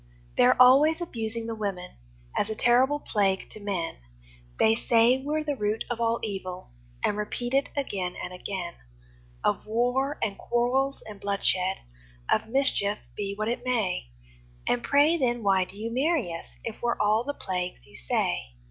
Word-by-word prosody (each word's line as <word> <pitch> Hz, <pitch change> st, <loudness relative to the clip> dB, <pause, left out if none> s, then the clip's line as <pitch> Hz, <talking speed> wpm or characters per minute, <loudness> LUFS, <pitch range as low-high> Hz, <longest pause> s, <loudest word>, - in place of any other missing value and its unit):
They're 125 Hz, -, +5 dB
always 275 Hz, +6 st, +7 dB
abusing 230 Hz, -8 st, -3 dB
the 230 Hz, -, -3 dB
women, 200 Hz, -5 st, -4 dB, 0.4 s
As 205 Hz, -, 0 dB
a 220 Hz, -, -2 dB
terrible 255 Hz, +6 st, +3 dB
plague 195 Hz, -7 st, 0 dB
to -, -, -9 dB
men; 195 Hz, -5 st, -3 dB, 0.6 s
They 220 Hz, -, +5 dB
say 235 Hz, +2 st, +4 dB
we're 305 Hz, +2 st, -1 dB
the 295 Hz, -2 st, -1 dB
root 210 Hz, -2 st, -1 dB
of 235 Hz, -1 st, -2 dB
all 230 Hz, 0 st, +2 dB
evil, 190 Hz, -4 st, -5 dB, 0.3 s
And 205 Hz, -, +1 dB
repeat 240 Hz, +4 st, -3 dB
it 275 Hz, +1 st, +2 dB
again 190 Hz, -10 st, -2 dB
and 180 Hz, -, -6 dB
again 180 Hz, -1 st, -4 dB, 0.7 s
Of -, -, 0 dB
war, 245 Hz, +6 st, +1 dB
and 205 Hz, -3 st, -2 dB
quarrels, 255 Hz, +3 st, 0 dB
and 210 Hz, -2 st, -10 dB
bloodshed, 190 Hz, -2 st, +1 dB, 0.5 s
All -, -, +5 dB
mischief, 225 Hz, -5 st, +2 dB, 0.2 s
be 200 Hz, -1 st, -3 dB
what 215 Hz, +1 st, -2 dB
it 235 Hz, -, -2 dB
may. 220 Hz, -, 0 dB, 0.6 s
And 245 Hz, -, +2 dB
pray, 295 Hz, +4 st, +4 dB
then, 240 Hz, -5 st, 0 dB
why 190 Hz, -2 st, +3 dB
do 195 Hz, -, -14 dB
you 225 Hz, +2 st, -4 dB
marry 270 Hz, -, +1 dB
us, 165 Hz, -, -7 dB, 0.2 s
If 225 Hz, -, -6 dB
we're 240 Hz, 0 st, 0 dB
all 215 Hz, +2 st, +3 dB
the 285 Hz, +2 st, -4 dB
plagues 180 Hz, -, -4 dB
you -, -, -17 dB
say? -, -, -1 dB
225 Hz, 165 wpm, -27 LUFS, 195-250 Hz, 0.7 s, always